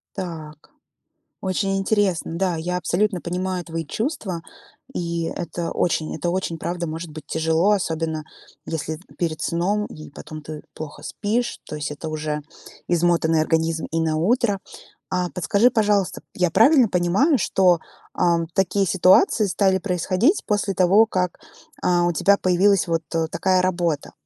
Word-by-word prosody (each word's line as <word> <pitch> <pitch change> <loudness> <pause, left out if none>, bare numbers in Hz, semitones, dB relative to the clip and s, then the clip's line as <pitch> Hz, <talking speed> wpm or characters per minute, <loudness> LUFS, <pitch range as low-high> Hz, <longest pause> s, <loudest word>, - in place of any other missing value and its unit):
Так. 155 -4 -7 0.7
Очень 195 +1 0
интересно. 195 -4 0
Да, 185 -2 0
я 175 +3 -2
абсолютно 180 +2 0
понимаю 180 +1 -2
твои 165 -1 -5
чувства, 215 - -3 0.5
и 170 -1 -2
это 170 0 -4
очень, 160 -2 0
это 175 - -1
очень, 180 -3 -2
правда, 170 +1 -3
может 160 +1 -6
быть 155 -1 -9
тяжело, 160 +4 +2
особенно, 160 -5 -1 0.4
если 160 -1 -3
это 160 - -16
перед 155 -2 -2
сном 195 +7 0
и 155 - -11
потом 155 +1 -9
ты 150 0 -8
плохо 155 -2 -8
спишь, 230 +3 -2
то - - -6
есть 150 0 -4
это 150 +2 -6
уже 155 -1 -3 0.5
измотанный 170 -2 +2
организм 160 0 0
и 165 - 0
на 155 -1 0
утро. 205 +3 +1 0.5
А 180 -1 -1
подскажи, 200 +8 +2
пожалуйста, 210 -4 +1
я 180 -2 +1
правильно 250 - +6
понимаю, 190 - +3
что, 185 -4 +3 0.3
ам, 170 -2 +1
такие 195 +1 +1
ситуации 190 - +4
стали 190 0 +2
происходить 185 - +1
после 205 -1 0
того, 190 +5 +5
как, 180 -5 -2 0.4
а, 175 -1 +2
у 175 - +2
тебя 200 +5 +4
появилась 185 +1 +3
вот 165 -1 0 0.3
такая 185 +2 +2
работа? 175 -5 -1
175 Hz, 145 wpm, -22 LUFS, 160-195 Hz, 0.7 s, правильно